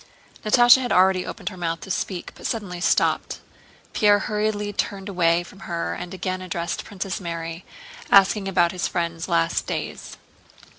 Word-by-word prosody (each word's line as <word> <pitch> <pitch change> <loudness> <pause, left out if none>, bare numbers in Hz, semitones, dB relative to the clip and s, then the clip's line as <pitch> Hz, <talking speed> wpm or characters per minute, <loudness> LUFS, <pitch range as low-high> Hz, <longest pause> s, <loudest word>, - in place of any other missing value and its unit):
Natásha 240 +4 +6
had 245 -3 -3
already 185 0 +4
opened - - -5
her 190 - -11
mouth 165 -1 -2
to 190 - -7
speak 185 -1 -3
but - - -6
suddenly 185 -6 -4
stopped. - - +1 0.5
Pierre 205 -1 +5
hurriedly 210 0 -2
turned 195 0 -3
away 175 -3 +2
from 190 +3 -15
her 170 -3 -3
and 180 - -7
again 185 0 -3
addressed 175 -2 -3
Princess 195 -2 -5
Mary, 165 0 -5 0.5
asking 195 0 +5
about 175 -3 +2
his 180 - -2
friend's 170 -1 -3
last 85 - +1
days. - - -5
185 Hz, 155 wpm, -23 LUFS, 170-205 Hz, 0.5 s, Natásha